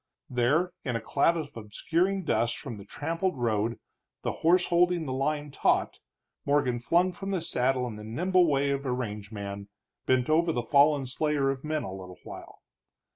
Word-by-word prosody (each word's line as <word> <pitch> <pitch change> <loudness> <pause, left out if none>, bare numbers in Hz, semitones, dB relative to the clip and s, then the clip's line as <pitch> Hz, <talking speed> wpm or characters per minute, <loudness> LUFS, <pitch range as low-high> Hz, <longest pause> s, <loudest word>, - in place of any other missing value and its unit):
There, 145 +9 +2
in 125 - -2
a - - 0
cloud 145 +9 +2
of 155 -3 -6
obscuring 170 - -1
dust 120 -7 +1
from 115 - -7
the 100 - -11
trampled 165 - -2
road, 115 -1 0 0.5
the - - 0
horse 180 +3 +4
holding 175 -1 +3
the 130 - -3
line 145 +2 -1
taut, - - +1 0.4
Morgan 140 -4 +1
flung 175 +9 +2
from 195 +2 -6
the 190 -2 0
saddle 130 -5 +1
in 115 -3 -6
the 105 - -9
nimble 175 +11 +2
way 140 -1 +2
of 140 0 -1
a - - 0
range 105 -4 -4
man, 100 -1 -6 0.4
bent 130 -1 +3
over 165 +2 +3
the 120 -6 -1
fallen 140 +2 +4
slayer 140 +1 0
of 135 -1 -6
men 155 0 -1
a 95 - -5
little 90 -2 -9
while. - - -11
140 Hz, 180 wpm, -28 LUFS, 120-165 Hz, 0.5 s, horse